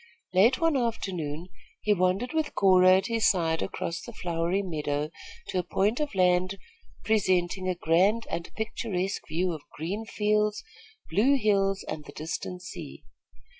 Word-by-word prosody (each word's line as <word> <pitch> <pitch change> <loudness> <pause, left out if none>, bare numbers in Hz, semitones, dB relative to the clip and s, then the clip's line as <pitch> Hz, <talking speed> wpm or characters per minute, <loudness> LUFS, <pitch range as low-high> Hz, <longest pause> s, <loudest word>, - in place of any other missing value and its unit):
Late 220 +8 +5
one 330 -2 +2
afternoon, 185 - -2 0.3
he 210 - +3
wandered 190 - 0
with 315 -1 -1
Cora 185 -1 +6
at 190 - -1
his 230 -2 +3
side 165 -4 +1
across 170 -1 -3
the 235 - -9
flowery 175 -1 -1
meadow 150 -4 -2 0.4
to 185 - 0
a - - -1
point 205 - 0
of 295 -8 -2
land 185 +1 +2 0.5
presenting 185 -3 +1
a 180 - 0
grand 185 +7 +2
and 165 0 -5
picturesque 215 -4 -2
view 175 +3 0
of 155 - -7 0.2
green 195 +8 -3
fields, 210 0 0 0.5
blue 230 +11 +4
hills 195 -5 +2
and 150 -1 -5
the - - -11
distant 175 +3 -5
sea. 180 - -9
185 Hz, 150 wpm, -28 LUFS, 175-215 Hz, 0.5 s, Cora